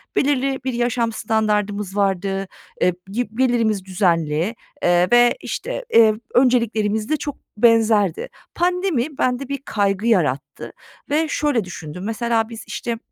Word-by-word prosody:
belirli 275 -1 +1
bir 260 -2 -2
yaşam 240 -1 0
standardımız 210 -2 -1
vardı, 195 0 0 0.3
eee, 180 - +3 0.2
gi 235 0 -2
gelirimiz 230 -6 +1
düzenli, 175 0 0 0.3
eee, 175 +1 +4
ve, 240 0 +5
işte, - - -5
eee, 220 -2 +7 0.2
önceliklerimiz 225 -4 +2
de 310 - +1
çok 290 -2 -5 0.2
benzerdi. 220 -5 +3 0.3
Pandemi 345 -6 0
bende 250 +1 0
bir 280 -2 -2
kaygı 200 +1 0
yarattı 150 - 0 0.4
ve 310 +2 +1
şöyle 290 -9 0
düşündüm, 180 -1 -8
mesela 225 0 0
biz, 225 -1 -8
işte, 235 -1 -4
225 Hz, 130 wpm, -21 LUFS, 195-250 Hz, 0.4 s, eee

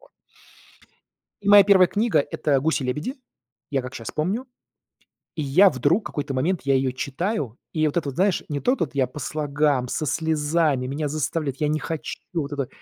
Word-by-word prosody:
Вот. - - -22 1.3
И - - -6
моя 205 0 +9
первая 190 -2 +6
книга- 210 -5 +1
это 140 -3 +1
"Гуси-лебеди". 150 - -1 0.5
Я 135 -3 0
как 130 +1 -8
щас 115 - -6
помню. 195 +12 -2 0.9
И 160 - -3
я 180 +9 +6
вдруг 160 - +1
какой-то 145 -2 -4
момент, 160 +8 0
я 135 0 +2
ее 130 -1 +1
читаю, 140 - -3 0.2
и 155 -1 +1
вот 150 - -2
это 150 -5 -1
вот 130 - -8
знаешь, 190 +2 +1
не 145 -2 -3
то 255 - +2
тут- 145 - -3
я 135 - +3
по 125 +4 -10
слогам, 145 -2 0
со 155 - -2
слезами, 150 -3 +1
меня 145 +2 -2
заставляют, 150 -2 -2
я 150 - 0
не 155 +1 0
хочу- 160 +1 -5 0.2
вот 150 -4 -2
это. 140 -1 -1
И 125 - -10
150 Hz, 185 wpm, -24 LUFS, 135-170 Hz, 1.3 s, моя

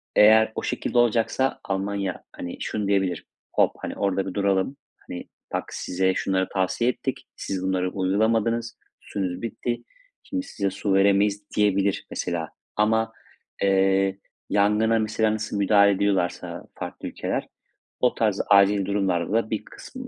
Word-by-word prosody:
eğer 110 +1 +7
o - - -3
şekilde 125 - -2
olacaksa 120 +3 +2
Almanya, 100 -1 -2
hani, 90 - -7
şunu 105 -2 -2
diyebilir: 95 -3 0 0.3
"Hop! - - +4
Hani, - - -5
orada 95 -1 0
bir 95 - -4
duralım. 100 +5 +1 0.3
Hani, 90 - -6 0.3
bak, - - 0
size 95 +1 0
şunları 95 0 0
tavsiye 95 +6 +1
ettik, 125 - -4
siz 95 -1 -4
bunları 95 -1 0
uygulamadınız, 110 +5 +1 0.2
suyunuz 95 -2 -4
bitti. 120 +1 -3 0.4
Şimdi 275 -1 -3
size 100 -1 -1
su 100 +1 -1
veremeyiz." 100 +1 +3
diyebilir 100 -1 +2
mesela. 85 -2 -3 0.3
Ama, 110 +1 +2 0.5
eee, 95 0 +3 0.3
yangına 105 +2 +3
mesela 110 0 +1
nasıl 110 -1 -3
müdahale 100 0 +5
ediyorlarsa 95 -3 -1 0.2
farklı - - -6
ülkeler, - - -3 0.5
o 125 - +2
tarz 105 -3 +1
acil 100 -1 +5
durumlarda 95 -2 0
da 115 -1 +1
bir 110 - -3
kısım, 260 -1 -10
100 Hz, 140 wpm, -25 LUFS, 95-110 Hz, 0.5 s, eğer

